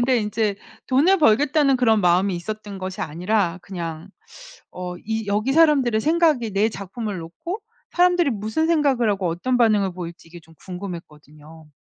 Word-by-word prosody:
근데 250 Hz, 0 st, +2 dB
인제 210 Hz, -1 st, -1 dB, 0.3 s
'돈을 310 Hz, +9 st, +4 dB
벌겠다'는 280 Hz, +2 st, +3 dB
그런 225 Hz, -4 st, +3 dB
마음이 180 Hz, +2 st, +3 dB
있었던 205 Hz, +2 st, -7 dB
것이 185 Hz, 0 st, -6 dB
아니라 180 Hz, +3 st, -1 dB
그냥 170 Hz, -2 st, -6 dB, 0.6 s
어 180 Hz, 0 st, -6 dB
이 220 Hz, 0 st, -3 dB
여기 210 Hz, +6 st, 0 dB
사람들의 275 Hz, -8 st, +4 dB
생각이 310 Hz, -5 st, +2 dB
내 200 Hz, +3 st, +2 dB
작품을 200 Hz, 0 st, -6 dB
놓고 175 Hz, -, -7 dB, 0.3 s
사람들이 355 Hz, -3 st, +3 dB
무슨 220 Hz, +8 st, -1 dB
생각을 280 Hz, -9 st, +2 dB
하고 195 Hz, -3 st, -1 dB
어떤 175 Hz, +10 st, -1 dB
반응을 210 Hz, -5 st, +3 dB
보일지 170 Hz, -1 st, -8 dB
이게 170 Hz, +1 st, -12 dB
좀 165 Hz, 0 st, -21 dB
궁금했거든요. 160 Hz, -4 st, -10 dB
210 Hz, 355 characters per minute, -22 LUFS, 180-255 Hz, 0.6 s, 돈을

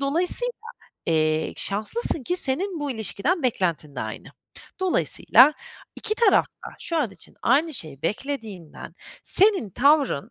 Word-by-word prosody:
dolayısıyla, 350 Hz, -, +1 dB, 0.5 s
eee, 155 Hz, -1 st, +1 dB
şanslısın 220 Hz, -, +1 dB
ki 355 Hz, +9 st, -2 dB
senin 335 Hz, +4 st, 0 dB
bu 290 Hz, -, -3 dB
ilişkiden 260 Hz, -, -1 dB
beklentin 170 Hz, -, -1 dB
de -, -, -3 dB
aynı. 110 Hz, 0 st, -7 dB, 0.5 s
Dolayısıyla 305 Hz, -6 st, +4 dB, 0.4 s
2 430 Hz, -1 st, -2 dB
taraf 445 Hz, -2 st, +3 dB
da -, -, -13 dB
şu 335 Hz, -, -1 dB
an 280 Hz, -10 st, 0 dB
için 185 Hz, -, -11 dB
aynı 295 Hz, +5 st, +2 dB
şeyi 150 Hz, -, -5 dB
beklediğinden 210 Hz, -, -6 dB, 0.3 s
senin 385 Hz, -, +3 dB
tavrın, 270 Hz, -, +2 dB
265 Hz, 130 wpm, -23 LUFS, -, 0.5 s, Dolayısıyla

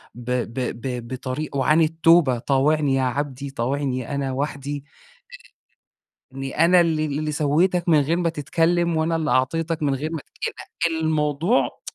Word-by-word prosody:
ب 120 Hz, -, -10 dB
ب 125 Hz, 0 st, -2 dB, 0.2 s
ب 125 Hz, -3 st, -4 dB
بطريقة 130 Hz, +3 st, -4 dB
وعن 155 Hz, +5 st, +3 dB
التوبة، 160 Hz, -5 st, +4 dB
طاوعني 140 Hz, +2 st, +2 dB
يا 135 Hz, -, +1 dB
عبدي، 140 Hz, +1 st, -3 dB
طاوعني 130 Hz, +1 st, -2 dB
أنا 135 Hz, -1 st, -2 dB
وحدي، 140 Hz, +1 st, -4 dB, 1.5 s
آآ، 130 Hz, -, -14 dB
إنّي 135 Hz, 0 st, -4 dB
أنا 180 Hz, +1 st, +6 dB
اللي 160 Hz, -2 st, +1 dB
اللي 150 Hz, +1 st, -2 dB
سويتك 165 Hz, +5 st, +1 dB
من 155 Hz, -3 st, +5 dB
غير 155 Hz, +4 st, +1 dB
ما 175 Hz, -1 st, +1 dB
تتكلّم 165 Hz, +2 st, 0 dB
وأنا 160 Hz, +1 st, +1 dB
اللي 160 Hz, -1 st, -1 dB
أعطيتك 160 Hz, +5 st, 0 dB
من 140 Hz, -2 st, +1 dB
غير 150 Hz, +4 st, -3 dB
ما 160 Hz, -, -2 dB
تكلّم -, -, -6 dB, 0.4 s
لأ، 160 Hz, -, -2 dB
الموضوع 155 Hz, -, +1 dB
145 Hz, 155 wpm, -23 LUFS, 135-165 Hz, 1.5 s, أنا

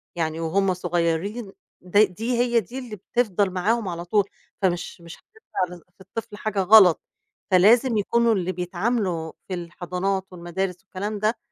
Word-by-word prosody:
يعني 160 Hz, -1 st, -2 dB
وهُم 185 Hz, +4 st, +1 dB
صغيّرين 180 Hz, +5 st, -1 dB, 0.3 s
د 180 Hz, +2 st, -2 dB, 0.2 s
دي 230 Hz, +5 st, -2 dB
هي 240 Hz, -1 st, +3 dB
دي 235 Hz, +6 st, -7 dB
اللي 240 Hz, -5 st, -7 dB
بتفضَل 205 Hz, -1 st, 0 dB
معاهم 205 Hz, +4 st, 0 dB
على 170 Hz, -1 st, -4 dB
طول، 205 Hz, +3 st, +3 dB, 0.4 s
فمش 175 Hz, -2 st, -1 dB
مش 170 Hz, 0 st, -11 dB
هنزرَع 185 Hz, -, -5 dB
ل -, -, -18 dB, 0.2 s
في -, -, -19 dB
الطفل 210 Hz, +3 st, -7 dB
حاجة 210 Hz, -1 st, -2 dB
غلط، 190 Hz, -3 st, +7 dB, 0.5 s
فلازم 225 Hz, +6 st, +5 dB
يكونوا 235 Hz, +3 st, +2 dB
اللي 185 Hz, -3 st, -1 dB
بيتعاملوا 180 Hz, -1 st, -1 dB, 0.2 s
في 190 Hz, -, -4 dB
الحضانات 180 Hz, +2 st, -3 dB
والمدارس 180 Hz, +1 st, -3 dB
والكلام 205 Hz, +2 st, -4 dB
ده 215 Hz, +3 st, +1 dB
190 Hz, 150 wpm, -24 LUFS, 175-220 Hz, 0.5 s, غلط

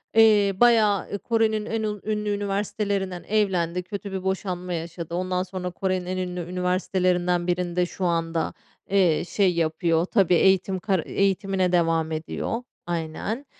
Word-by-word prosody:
eee, 210 Hz, -3 st, +6 dB
bayağı 215 Hz, -4 st, +3 dB
Kore'nin 220 Hz, 0 st, +1 dB
en 225 Hz, 0 st, -2 dB
un 210 Hz, -2 st, -3 dB
ünlü 210 Hz, -1 st, -2 dB
üniversitelerinden 200 Hz, -2 st, -2 dB
evlendi, 180 Hz, -4 st, 0 dB
kötü 200 Hz, +1 st, -6 dB
bir 190 Hz, -1 st, -4 dB
boşanma 185 Hz, -2 st, -2 dB
yaşadı. 170 Hz, 0 st, -5 dB
Ondan 185 Hz, 0 st, -1 dB
sonra, 185 Hz, -1 st, -5 dB
Kore'nin 185 Hz, 0 st, -2 dB
en 185 Hz, +1 st, -3 dB
ünlü 180 Hz, -1 st, -3 dB
üniversitelerinden 180 Hz, -1 st, 0 dB
birinde 180 Hz, 0 st, 0 dB
şu 185 Hz, +1 st, -4 dB
anda, 165 Hz, -1 st, 0 dB, 0.4 s
eee, 185 Hz, -5 st, +3 dB
şey 185 Hz, +1 st, +2 dB
yapıyor, 165 Hz, 0 st, +1 dB
tabii 190 Hz, -3 st, +3 dB
eğitim 190 Hz, +1 st, +3 dB
kar 190 Hz, -1 st, 0 dB
eğitimine 195 Hz, -1 st, +1 dB
devam 165 Hz, -2 st, +2 dB
ediyor. 165 Hz, +9 st, -3 dB, 0.2 s
Aynen, 175 Hz, -, -3 dB
185 Hz, 135 wpm, -25 LUFS, 175-200 Hz, 0.4 s, eee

